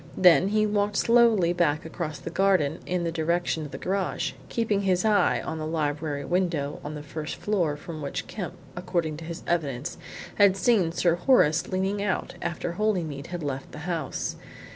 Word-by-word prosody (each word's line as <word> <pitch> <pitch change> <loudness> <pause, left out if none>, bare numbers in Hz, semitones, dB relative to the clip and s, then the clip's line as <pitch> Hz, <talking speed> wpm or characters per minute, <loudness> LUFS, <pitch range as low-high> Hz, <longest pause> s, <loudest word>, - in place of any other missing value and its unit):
Then 180 0 +6
he 215 +1 +2
walked 205 -1 0
slowly 230 -7 +4
back 155 -4 +1
across 160 -2 -4
the 150 +5 -7
garden 185 -6 +2
in 180 -1 0
the 165 - -1
direction 165 0 0
of - - -15
the - - -6
garage, 190 0 -1 0.2
keeping 215 -4 0
his 185 0 +1
eye 205 -5 +3
on 160 - -4
the 155 - -3
library 150 -2 -2
window 170 -6 0
on 150 +1 -5
the 150 - -7
first 150 +1 -5
floor 175 -8 0
from 155 +1 -8
which 140 - -4
Kemp, 195 -5 -6 0.2
according 170 -3 -2
to 160 - -8
his 170 0 -6
evidence, 145 -5 -2 0.4
had 200 -2 +6
seen 195 -5 +3
Sir 170 0 +2
Horace 175 - +4
leaning 190 +2 -1
out 200 -2 -1
after 170 0 -3
Holymead 170 -7 -1
had 175 -2 -5
left 135 -2 -4
the - - -7
house. 170 -3 -3
170 Hz, 180 wpm, -26 LUFS, 155-195 Hz, 0.4 s, Then